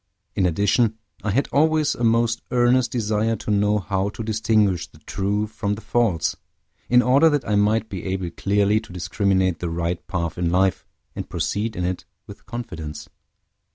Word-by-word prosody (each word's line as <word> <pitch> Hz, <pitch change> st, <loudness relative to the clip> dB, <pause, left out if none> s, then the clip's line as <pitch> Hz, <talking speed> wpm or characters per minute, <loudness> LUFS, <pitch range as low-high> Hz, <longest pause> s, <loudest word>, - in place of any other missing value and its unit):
In 95 Hz, -, +2 dB
addition, 105 Hz, +6 st, +2 dB, 0.3 s
I 110 Hz, -, -1 dB
had 130 Hz, +8 st, +1 dB
always 155 Hz, 0 st, +3 dB
a 120 Hz, -, -5 dB
most 115 Hz, 0 st, +2 dB
earnest 125 Hz, 0 st, +3 dB
desire 110 Hz, -1 st, 0 dB
to 105 Hz, -, -4 dB
know 105 Hz, +1 st, +3 dB
how 95 Hz, 0 st, -1 dB
to 110 Hz, -, -7 dB
distinguish 105 Hz, -4 st, +1 dB
the -, -, -19 dB
true 100 Hz, +7 st, -2 dB
from 105 Hz, -1 st, -3 dB
the 105 Hz, -, -10 dB
false, 110 Hz, -11 st, +1 dB, 0.5 s
in 125 Hz, 0 st, +5 dB
order 140 Hz, +6 st, +5 dB
that 145 Hz, -2 st, -1 dB
I 105 Hz, -, 0 dB
might 105 Hz, +2 st, +2 dB
be 95 Hz, -4 st, -6 dB
able 95 Hz, -2 st, -2 dB
clearly 100 Hz, +3 st, +2 dB
to 90 Hz, -, -13 dB
discriminate 95 Hz, 0 st, 0 dB
the 85 Hz, -, -3 dB
right 85 Hz, +1 st, -3 dB
path 85 Hz, -3 st, -3 dB
in 85 Hz, -1 st, +1 dB
life, 95 Hz, +1 st, +1 dB, 0.3 s
and -, -, -6 dB
proceed 110 Hz, +1 st, -2 dB
in 90 Hz, -, -2 dB
it 90 Hz, 0 st, -3 dB, 0.2 s
with -, -, -13 dB
confidence. 90 Hz, -10 st, -6 dB
105 Hz, 175 wpm, -23 LUFS, 95-115 Hz, 0.5 s, in